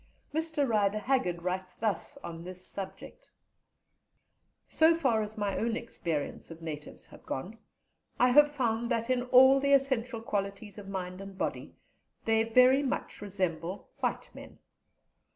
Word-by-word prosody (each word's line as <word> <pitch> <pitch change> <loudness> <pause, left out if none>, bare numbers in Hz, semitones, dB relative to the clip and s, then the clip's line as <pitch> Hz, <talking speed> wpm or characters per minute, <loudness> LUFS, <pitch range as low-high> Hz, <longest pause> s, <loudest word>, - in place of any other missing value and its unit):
Mr 315 -2 0
Rider 210 -3 +2
Haggard 205 -8 0
writes 185 0 -3
thus 225 +6 -2
on 165 0 -7
this 185 +1 -8
subject: 200 - -8 1.4
"So 320 +1 +4
far 260 -9 +2
as 215 +1 -6
my 205 -2 -1
own 230 0 0
experience 165 -11 -4
of 165 0 -10
natives 155 -2 -8
has - - -15
gone, 195 +12 -6 0.6
I 250 - +5
have 295 +3 +6
found 235 -4 -1
that 230 0 0
in 250 -1 +2
all 260 +2 +7
the 280 +1 +2
essential 260 -4 +1
qualities 200 0 -3
of 195 -1 -10
mind 185 -1 -5
and 195 -1 -9
body - - -3 0.5
they 225 0 +3
very 255 +4 +5
much 275 -6 -3
resemble 185 -2 -3
white - - -2
men. - - -12
220 Hz, 145 wpm, -30 LUFS, 190-255 Hz, 1.4 s, all